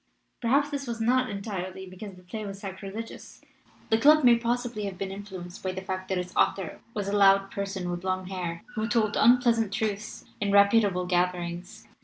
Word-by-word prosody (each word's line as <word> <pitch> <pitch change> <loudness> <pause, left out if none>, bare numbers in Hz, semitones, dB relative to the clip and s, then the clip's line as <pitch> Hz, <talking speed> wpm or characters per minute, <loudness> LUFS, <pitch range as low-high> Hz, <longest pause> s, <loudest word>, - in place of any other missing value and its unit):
Perhaps 280 +5 +2
this 280 -2 -4
was 235 -1 -4
not 255 +3 +2
entirely 190 -2 -5
because 185 +2 -9
the 180 - -16
play 215 +5 -6
was 195 -1 -6
'sacrilegious'; 200 +3 -8 0.5
the 220 - +4
club 300 +4 +6
may 240 -1 +7
possibly 235 -2 -2
have 195 -2 -5
been 195 0 -4
influenced 190 -3 -8
by 185 -1 -2
the 190 - -5
fact 185 0 -4
that 190 - 0
its 180 0 -5
author 190 -4 +1 0.2
was 205 -2 -2
a 200 - 0
loud 195 -1 +5
person 195 -2 -4
with 175 0 -5
long 185 0 -1
hair, 180 -2 -5
who 220 -2 -2
told 225 -3 +1
unpleasant 235 -3 +4
truths 215 0 -3
in 200 -1 0
reputable 200 -2 +4
gatherings. 180 0 -2
200 Hz, 185 wpm, -27 LUFS, 185-225 Hz, 0.5 s, may